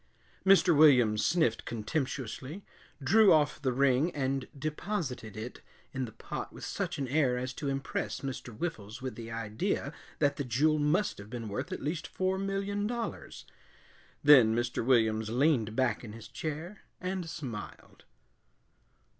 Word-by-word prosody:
Mr. 190 -3 +6
Williams 125 -8 +6
sniffed 160 -9 +2
contemptuously, 130 - -4 0.4
drew 205 +9 +6
off 150 -2 +3
the 130 -3 +1
ring, 135 +4 +3
and 135 -1 -1
deposited 145 - -3
it 115 +3 -7 0.3
in 130 -1 -2
the 115 - -9
pot - - -6
with - - -8
such - - -3
an 135 - -2
air 130 -2 +2
as 130 0 -3
to 145 +1 -3
impress 135 0 -3
Mr. 130 -2 -5
Whiffles 110 -3 -5
with 130 - -3
the 115 -1 -8
idea 115 -2 -2 0.2
that 140 0 +2
the 140 - -1
jewel 150 +6 +2
must 150 - +1
have 100 +1 -10
been 115 -2 -5
worth 100 - -4
at - - -5
least 155 +3 -2
four 190 0 -1
million 195 +1 -1
dollars. 235 0 -5 0.8
Then 130 -7 +7
Mr. 120 0 -1
Williams 110 -3 +3
leaned 120 -3 +2
back 130 -3 +1
in 105 -3 -8
his 115 0 -10
chair 160 +6 -5 0.2
and 185 -2 -3
smiled. 125 -11 -8
135 Hz, 150 wpm, -30 LUFS, 115-160 Hz, 0.8 s, Then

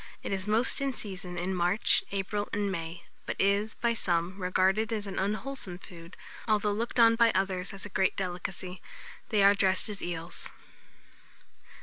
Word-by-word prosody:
It - - -2
is 190 +1 -3
most 230 +7 +2
in 275 -1 0
season 185 -5 -6
in 180 +2 -1
March, 180 +3 +2
April, 205 +1 -2
and 205 -1 0
May, 170 -1 -5 0.2
but - - -2
is, 200 +2 +2
by 235 -1 +1
some, 180 -2 -1
regarded 190 +4 +2
as 215 -2 -2
an 195 -1 -4
unwholesome 210 -1 -3
food, 170 -1 -12 0.3
although 210 -1 +2
looked 230 +4 -2
on 230 0 +7
by 230 0 +5
others 190 0 0
as 195 -1 -6
a - - -7
great 190 -1 +1
delicacy. 180 0 -4 0.5
They 210 -4 +3
are 200 +1 +8
dressed 190 0 +3
as 205 -1 -4
eels. 170 0 -5
195 Hz, 165 wpm, -29 LUFS, 180-215 Hz, 0.5 s, are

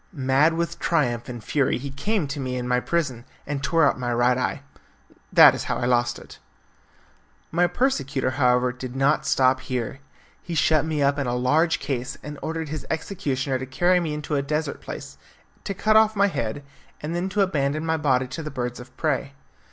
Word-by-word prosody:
Mad 140 +2 +2
with 170 0 -2
triumph 120 -8 0
and 120 -3 -7
fury 140 +1 +1
he 140 +2 -6
came 195 +6 -1
to 140 +2 -5
me 130 -1 -3
in 125 -1 -3
my 125 0 +2
prison 130 -6 -2 0.2
and 140 -1 -3
tore 160 +3 +3
out - - 0
my 120 -1 -2
right 120 +1 +3
eye. 130 +2 -2 0.7
That - - +9
is - - -4
how - - -1
I - - -2
lost 120 -1 +1
it. - - -13 1.1
My 175 +2 +3
persecutor, 145 - 0
however, 125 -2 +2
did 125 0 -8
not 135 +1 +2
stop 130 0 +3
here. 130 0 -4 0.4
He 170 - -5
shut 155 -1 +3
me 155 -2 0
up 140 +1 +2
in 140 - -1
a 120 - 0
large 150 +7 +2
case 130 -3 -4
and 150 -1 -7
ordered 160 -1 -4
his 155 0 -4
executioner 140 -6 -2
to 130 - -5
carry 175 +7 +3
me 160 -4 -2
into 150 0 -5
a 140 - +2
desert 150 +1 -2
place, - - -8 0.5
to 200 - -3
cut 215 +3 +2
off 220 0 +5
my 200 0 +3
head, 115 - -3 0.4
and 155 +3 -4
then 180 +2 -1
to 205 +2 0
abandon 155 -4 0
my 160 0 +1
body 130 -4 +2
to 150 +5 -5
the 155 - -5
birds 125 -3 -4
of 125 +1 -13
prey. 140 -3 -1
140 Hz, 200 wpm, -24 LUFS, 130-160 Hz, 1.1 s, That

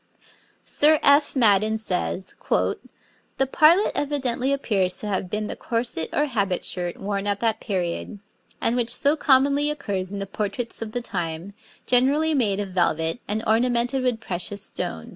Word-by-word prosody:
Sir 305 +1 +3
F. 285 +1 +4
Madden 215 -3 +3
says: 190 -2 -2 0.2
'The 270 - -3
partlet 340 +6 +5
evidently 270 -3 -1
appears 200 -10 0
to - - -5
have 190 -2 -2
been 210 +2 -2
the - - -5
corset 230 -8 -2
or 295 - +1
habit 200 -9 -1
shirt 175 -1 -3
worn 200 0 -3
at 200 0 0
that 225 -2 0
period, 185 0 -3 0.4
and 230 - +1
which 240 -1 0
so 285 +5 +3
commonly 280 0 +3
occurs 200 -11 -3
in 200 - -5
the 195 - -3
portraits 215 +4 -4
of 220 -1 -5
the 245 - -3
time, 175 -2 -4 0.3
generally 280 +6 +3
made 210 -8 +1
of 200 -2 -3
velvet 165 0 0
and 215 +2 -2
ornamented 240 +3 +1
with 250 -3 0
precious 200 0 -3
stones.' - - -4
220 Hz, 160 wpm, -24 LUFS, 195-265 Hz, 0.4 s, partlet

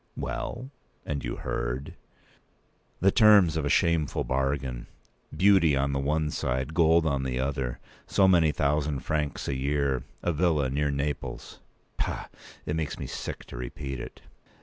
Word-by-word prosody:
"Well, 130 +3 -4 0.3
and 70 -1 -3
you - - -3
heard—" 60 +3 -3 1.1
"The 95 +2 +5
terms 105 -7 +6
of 80 -2 -1
a - - 0
shameful 80 -1 +2
bargain—beauty 70 +6 0
on 70 +1 +1
the 70 - 0
one 75 +2 0
side, 65 +4 -2
gold 80 0 +4
on 70 -3 +1
the 65 -1 -2
other; 65 -2 -2 0.3
so 95 - +4
many 85 -4 +5
thousand 75 -1 0
francs 75 -2 -2
a - - 0
year; 70 -1 0 0.2
a 85 - +1
villa 75 -5 +1
near 75 +2 0
Naples—Pah! 70 0 -5 0.4
it 75 - -2
makes 75 -3 -2
me - - -5
sick - - -6
to - - -9
repeat 65 +2 -5
it." - - -9
70 Hz, 145 wpm, -27 LUFS, 65-80 Hz, 1.1 s, terms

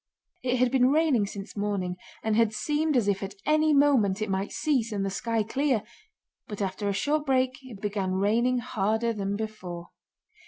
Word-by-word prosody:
It 255 0 0
had 250 0 +2
been 255 -1 +4
raining 285 -8 +3
since 195 -1 -8
morning 200 -3 -2 0.3
and 220 -1 +1
had 225 -1 +3
seemed 300 +1 +1
as 225 -4 +1
if 195 -1 +1
at 195 0 -5
any 310 +1 +3
moment 275 -9 +4
it 215 -2 -2
might 190 +1 -1
cease 255 -7 0
and 200 -2 -1
the 195 - -2
sky 225 +3 -1
clear, 260 0 0 0.6
but 210 - -7
after 200 +1 -2
a - - +2
short 290 +10 0
break 255 -1 +1
it 250 -6 -11
began 200 -2 -2
raining 225 +6 +2
harder 230 -1 0
than 200 -1 -2
before. 185 -5 -6
220 Hz, 185 wpm, -27 LUFS, 200-255 Hz, 0.6 s, been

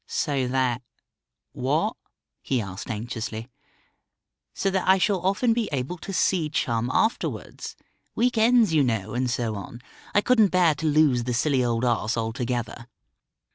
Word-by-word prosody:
"So 140 -4 -1
that 130 -1 0 0.7
what?" - - 0 0.5
he 130 - -1
asked 100 +1 -6
anxiously. 115 +1 -5 1.1
"So 195 - 0
that 190 -1 -1
I 190 +1 +6
shall 190 -1 +1
often 210 +5 +2
be 230 -2 -1
able 140 +6 -3
to 195 - -7
see 180 -4 +1
Chum 120 -5 -1
afterwards. 220 - -2 0.4
Week 250 +1 +1
ends, 225 -4 +4
you 155 - +4
know, 110 -5 -1
and 125 +1 0
so 120 -2 -1
on. 105 +3 -8 0.4
I 205 - +5
couldn't 225 -2 +4
bear 180 -4 +3
to 155 +2 -3
lose 145 -6 +3
the 125 -1 -1
silly 130 0 +2
old 120 0 0
ass 115 -1 0
altogether." 115 0 -3
130 Hz, 150 wpm, -25 LUFS, 120-185 Hz, 1.1 s, I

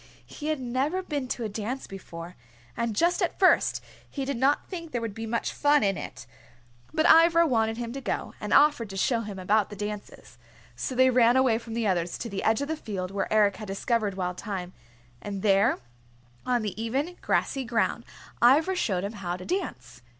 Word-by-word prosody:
He 300 - -7
had 310 -2 0
never 265 +9 -1
been 290 -7 -3
to 245 - -3
a - - -1
dance 220 +6 -4
before, 175 -2 -9 0.4
and 235 -2 -2
just 345 - +2
at 355 - 0
first 375 - +3 0.3
he 275 -2 -4
did 280 0 -2
not 270 +4 +2
think 335 -4 -7
there 240 - 0
would 230 -3 -4
be 225 +1 -6
much 230 +1 -2
fun 290 -2 +3
in 195 -1 +2
it. - - -8 0.7
But 315 - +1
Ivra 335 0 +7
wanted 225 -5 +1
him 235 -1 -4
to 275 - -5
go, 250 - -3
and 210 - -4
offered 285 -7 +4
to 195 - -7
show 230 +5 +2
him 205 -3 -7
about 205 +3 +1
the 205 - -8
dances. 210 0 -7 0.4
So 260 - -4
they 260 +1 +5
ran 240 0 +5
away 250 -4 +3
from 230 -1 -8
the 230 -1 -1
others 175 -3 0
to 235 - -5
the 195 -2 -4
edge 220 +4 +2
of 285 - -2
the 315 - -1
field 195 -10 -5
where 195 0 -2
Eric 210 -2 +3
had 215 - -8
discovered 205 +1 -1
Wild 180 -1 -3
Thyme, 185 -4 -5 0.5
and 200 -2 -5
there 200 +2 +4 0.7
on 245 -2 +1
the 210 +1 -4
even, 275 +10 -2
grassy 270 -1 0
ground 235 -1 0 0.4
Ivra 305 +10 +5
showed 190 - 0
him 200 +2 -4
how 180 -4 -4
to 180 - -9
dance. 125 - -4
230 Hz, 205 wpm, -27 LUFS, 200-275 Hz, 0.7 s, Ivra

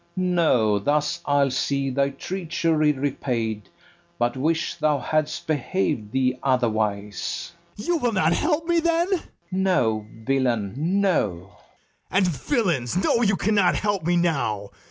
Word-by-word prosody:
No, 160 - +2
thus 150 - 0
I'll 140 -1 +3
see 135 +1 -1
thy 140 +1 +1
treachery 160 0 0
repaid, 125 -6 -2 0.5
But 120 +1 0
wish 160 +5 0
thou 150 -1 +1
hadst 155 +2 -1
behav'd 145 - -1
thee 130 0 0
otherwise. 110 -6 -1 0.2
BARABAS. 205 - -7
You 350 -1 +2
will 245 -6 0
not 170 -5 +2
help 320 - 0
me, 340 -1 +3
then? 335 +2 +1
FERNEZE. 380 -4 -1 0.2
No, 150 - +1 0.2
villain, 125 -7 0
no. 155 - 0 0.6
BARABAS. - - 0
And, 190 -1 +4
villains, 175 - 0
know 195 +5 +2
you 200 -4 +3
cannot 200 -2 +2
help 205 -4 -1
me 175 +2 +2
now. 120 -12 0
150 Hz, 135 wpm, -24 LUFS, 125-185 Hz, 0.6 s, And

